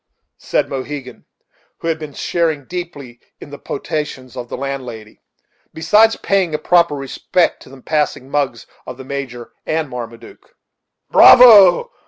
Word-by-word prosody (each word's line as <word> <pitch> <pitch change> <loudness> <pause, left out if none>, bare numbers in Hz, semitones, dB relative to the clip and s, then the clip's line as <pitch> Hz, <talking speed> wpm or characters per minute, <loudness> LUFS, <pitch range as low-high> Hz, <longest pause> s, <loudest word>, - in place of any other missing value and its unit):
said - - -1
Mohegan, 135 -1 -7 0.5
who - - -7
had 165 -1 -1
been 150 -2 -9
sharing 160 -5 -2
deeply 145 -8 -8 0.2
in 145 - -12
the 145 - -10
potations 145 -4 -6
of 120 -1 -7
the - - -6
landlady, 125 -5 -7 0.5
besides 210 +7 +3
paying 190 -5 -1
a - - 0
proper 170 -2 +2
respect 145 +5 -1
to - - -15
the 135 -1 -15
passing 150 -4 -2
mugs 135 -4 -2 0.2
of 125 - -8
the 130 - -11
Major 130 -4 -7 0.2
and 155 -2 -2
Marmaduke. 120 -2 -10 0.6
"Bravo! 225 - +7
145 Hz, 140 wpm, -17 LUFS, 130-165 Hz, 0.6 s, Bravo